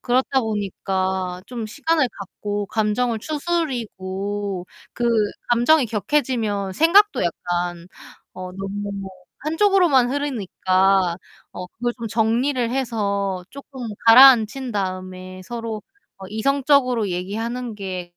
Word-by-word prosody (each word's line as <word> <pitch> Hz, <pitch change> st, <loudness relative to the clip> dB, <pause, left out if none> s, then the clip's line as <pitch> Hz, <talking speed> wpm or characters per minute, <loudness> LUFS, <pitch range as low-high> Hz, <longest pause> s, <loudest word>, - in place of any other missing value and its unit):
그렇다 260 Hz, +2 st, +1 dB
보니까 190 Hz, -3 st, -2 dB
좀 235 Hz, -3 st, -5 dB
시간을 290 Hz, +4 st, +1 dB
갖고 205 Hz, +1 st, -4 dB
감정을 220 Hz, +2 st, 0 dB
추스리고 205 Hz, -, -3 dB, 0.3 s
그 240 Hz, -, -3 dB, 0.5 s
감정이 240 Hz, +4 st, +4 dB
격해지면 215 Hz, -3 st, -1 dB
생각도 385 Hz, -, +4 dB
약간 175 Hz, 0 st, -2 dB, 0.5 s
어 185 Hz, 0 st, -7 dB
너무 195 Hz, 0 st, -5 dB, 0.3 s
한쪽으로만 320 Hz, -6 st, +3 dB
흐르니까 195 Hz, -9 st, +1 dB, 0.4 s
어 180 Hz, -, -7 dB
그걸 240 Hz, +5 st, -3 dB
좀 230 Hz, -1 st, -5 dB
정리를 230 Hz, +3 st, +1 dB
해서 200 Hz, -7 st, -1 dB
쪼끔 265 Hz, -3 st, -8 dB, 0.2 s
가라앉힌 250 Hz, 0 st, +7 dB
다음에 185 Hz, -1 st, -5 dB
서로 230 Hz, -1 st, -5 dB, 0.4 s
어 190 Hz, -, -9 dB
이성적으로 255 Hz, 0 st, +2 dB
얘기하는 225 Hz, +6 st, -4 dB
게 185 Hz, -3 st, -5 dB
220 Hz, 250 characters per minute, -22 LUFS, 190-255 Hz, 0.5 s, 가라앉힌